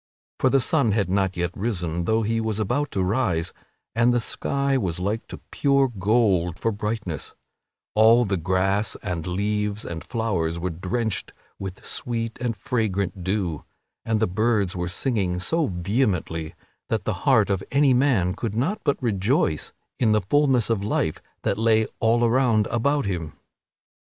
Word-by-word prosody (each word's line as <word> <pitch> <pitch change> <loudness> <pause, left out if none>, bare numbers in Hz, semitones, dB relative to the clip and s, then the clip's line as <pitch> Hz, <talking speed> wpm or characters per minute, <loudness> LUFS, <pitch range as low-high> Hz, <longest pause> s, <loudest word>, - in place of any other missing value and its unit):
For 130 - +4
the 135 - +4
sun 135 - +2
had 100 -4 0
not 95 -1 +1
yet 85 0 -1
risen, 85 -6 -2
though 110 +2 +2
he 115 +1 0
was 110 -2 -1
about 130 +7 0
to 95 - -1
rise, 90 -5 0 0.4
and 115 +2 +3
the 120 - +2
sky 140 +4 0
was 90 -9 -1
like 105 +5 -2
to - - -8
pure 140 -1 +3
gold 100 -5 +1
for 115 - 0
brightness; 105 - -4 0.6
all 115 +3 +6
the 100 -1 0
grass 95 +4 0
and 90 -5 -3
leaves 105 +3 -1
and 80 -2 -5
flowers 95 -8 -1
were 90 +2 -2
drenched 105 +6 -3 0.3
with 95 -1 -7
sweet 115 -1 -3
and 120 -3 -1
fragrant 100 -4 -1
dew, 95 -5 -1 0.4
and 110 -1 0
the 110 - +3
birds 105 0 +1
were 90 -1 -2
singing 95 -3 -1
so 160 - 0
vehemently 90 -4 -1 0.3
that - - 0
the - - -1 0.2
heart - - +4
of 95 -1 -1
any 140 -1 +4
man 125 -9 +2
could 110 +1 -4
not 160 - 0
but 140 - +1
rejoice 105 - +1 0.3
in 110 -3 +3
the 105 - +3
fulness 130 +2 +2
of 105 -3 0
life 80 -6 -1 0.2
that 100 - 0
lay 110 -1 +3
all 120 +1 +3
around 115 -3 +3
about 140 +4 +1
him. 85 -6 -3
105 Hz, 160 wpm, -24 LUFS, 90-120 Hz, 0.6 s, all